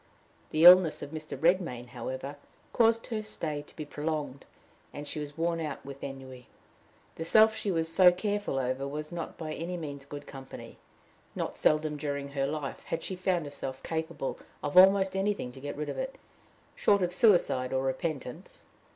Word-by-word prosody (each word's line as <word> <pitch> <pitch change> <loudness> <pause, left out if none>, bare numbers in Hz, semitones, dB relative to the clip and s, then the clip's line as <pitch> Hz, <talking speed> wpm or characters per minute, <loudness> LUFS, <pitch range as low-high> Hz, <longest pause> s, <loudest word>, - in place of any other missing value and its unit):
The 155 +1 +1
illness 180 -2 +8
of 145 - -7
Mr. 155 -1 -6
Redmain, 165 -9 +1
however, 130 +3 -5 0.4
caused 230 -1 +3
her 220 -2 -3
stay 160 -8 -4
to 145 - -17
be 155 - -6
prolonged, 145 -3 -4 0.5
and 145 0 -7
she 150 - -3
was 145 0 -7
worn 165 0 0
out 150 -5 -5
with 140 0 -9
ennui. 130 -3 -8 0.7
The 165 - -3
self 220 +6 +5
she 210 - -2
was 165 -3 +1
so 180 +2 +7
careful 205 -4 -2
over 130 +1 -1
was 150 +3 -5
not 170 -1 -5
by 155 -2 -5
any 175 +3 -4
means 140 -4 -6
good 145 0 -8
company: 135 -1 -10 0.6
not - - -3
seldom 155 0 +2
during 140 -1 -3
her 135 -1 -1
life 145 -1 -5
had 165 - -3
she 190 - -4
found 180 -3 0
herself 135 -2 -6
capable 160 -3 -3 0.2
of 145 +2 -3
almost 190 +1 +7
anything 195 -9 -1
to 130 - -11
get 145 +1 -5
rid 150 - -3
of - - -4
it, - - -4 0.6
short 200 -2 +3
of 180 0 -1
suicide 175 - +3
or 130 0 0
repentance. 140 +3 -4
155 Hz, 175 wpm, -29 LUFS, 140-180 Hz, 0.7 s, illness